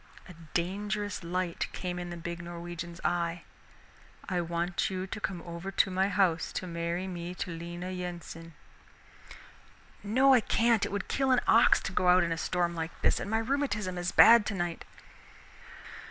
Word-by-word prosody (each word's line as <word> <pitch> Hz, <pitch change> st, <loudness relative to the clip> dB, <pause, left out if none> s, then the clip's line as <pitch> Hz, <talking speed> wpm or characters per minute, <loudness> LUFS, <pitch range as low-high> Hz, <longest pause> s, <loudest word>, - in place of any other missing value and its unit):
A 180 Hz, -, -11 dB, 0.2 s
dangerous 205 Hz, +3 st, -2 dB
light 175 Hz, 0 st, -2 dB
came 180 Hz, -1 st, -4 dB
in 175 Hz, 0 st, -5 dB
the 175 Hz, -, -6 dB
big 170 Hz, 0 st, -5 dB
Norwegian's 170 Hz, 0 st, -7 dB
eye. 170 Hz, -1 st, -1 dB, 0.8 s
"I 180 Hz, -2 st, 0 dB
want 170 Hz, +1 st, -1 dB
you 185 Hz, -1 st, -3 dB
to 195 Hz, -, -6 dB
come 180 Hz, -5 st, -4 dB
over 170 Hz, +2 st, -6 dB
to 195 Hz, 0 st, +2 dB
my 190 Hz, +2 st, +1 dB
house 180 Hz, -4 st, +1 dB
to -, -, -3 dB
marry 170 Hz, +1 st, -3 dB
me 175 Hz, -1 st, -6 dB
to 180 Hz, -, -4 dB
Lena 175 Hz, +2 st, -6 dB
Yensen." 170 Hz, -3 st, -7 dB, 1.5 s
"No, 260 Hz, +7 st, +4 dB
I 255 Hz, -, +7 dB
can't, 230 Hz, 0 st, +2 dB
it -, -, -9 dB
would 200 Hz, -1 st, -3 dB
kill 270 Hz, -1 st, 0 dB
an 255 Hz, -1 st, +4 dB
ox 230 Hz, -, +6 dB
to -, -, -4 dB
go 185 Hz, -1 st, +1 dB
out 180 Hz, +1 st, +6 dB
in 170 Hz, -, -1 dB
a -, -, +1 dB
storm 175 Hz, -1 st, 0 dB
like 165 Hz, 0 st, -5 dB
this, -, -, +3 dB
and -, -, -5 dB
my 220 Hz, -, +1 dB
rheumatism 220 Hz, -7 st, -1 dB
is 175 Hz, +1 st, -2 dB
bad 235 Hz, -1 st, +8 dB
tonight." 175 Hz, -5 st, -3 dB
180 Hz, 170 wpm, -30 LUFS, 170-200 Hz, 1.5 s, bad